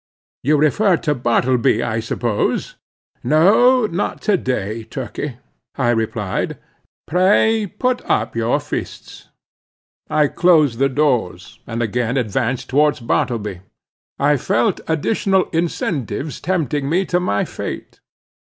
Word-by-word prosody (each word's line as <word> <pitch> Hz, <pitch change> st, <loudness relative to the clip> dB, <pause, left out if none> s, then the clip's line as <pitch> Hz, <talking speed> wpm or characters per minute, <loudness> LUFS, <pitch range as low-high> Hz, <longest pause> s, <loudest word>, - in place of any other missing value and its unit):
"You 150 Hz, +3 st, +2 dB
refer 175 Hz, +6 st, +3 dB
to 150 Hz, -2 st, -1 dB
Bartleby, 125 Hz, -1 st, +1 dB
I 115 Hz, -1 st, -1 dB
suppose. 115 Hz, -1 st, -1 dB, 0.5 s
No, 215 Hz, -, +4 dB
not 185 Hz, -1 st, -2 dB
to 210 Hz, -, +3 dB
day, 115 Hz, -, -2 dB
Turkey," 130 Hz, +2 st, -6 dB, 0.4 s
I 120 Hz, -3 st, +1 dB
replied; 110 Hz, -4 st, -2 dB, 0.5 s
"pray, 205 Hz, +5 st, +3 dB
put 250 Hz, +6 st, -1 dB
up 110 Hz, +2 st, 0 dB
your 115 Hz, 0 st, +1 dB
fists." -, -, -7 dB, 0.8 s
I 150 Hz, -, +3 dB
closed 155 Hz, -8 st, +3 dB
the 135 Hz, 0 st, +3 dB
doors, 125 Hz, -7 st, -1 dB
and 115 Hz, 0 st, -2 dB
again 120 Hz, +3 st, -1 dB
advanced 120 Hz, +1 st, -1 dB
towards 145 Hz, +1 st, +2 dB
Bartleby. 110 Hz, -5 st, -2 dB, 0.6 s
I 145 Hz, +1 st, +3 dB
felt 120 Hz, -1 st, 0 dB
additional 190 Hz, +4 st, +1 dB
incentives 160 Hz, -4 st, -2 dB
tempting 150 Hz, -6 st, -1 dB
me 185 Hz, +5 st, +1 dB
to 180 Hz, -1 st, +1 dB
my 180 Hz, -, 0 dB
fate. -, -, -7 dB
140 Hz, 115 wpm, -19 LUFS, 120-175 Hz, 0.8 s, No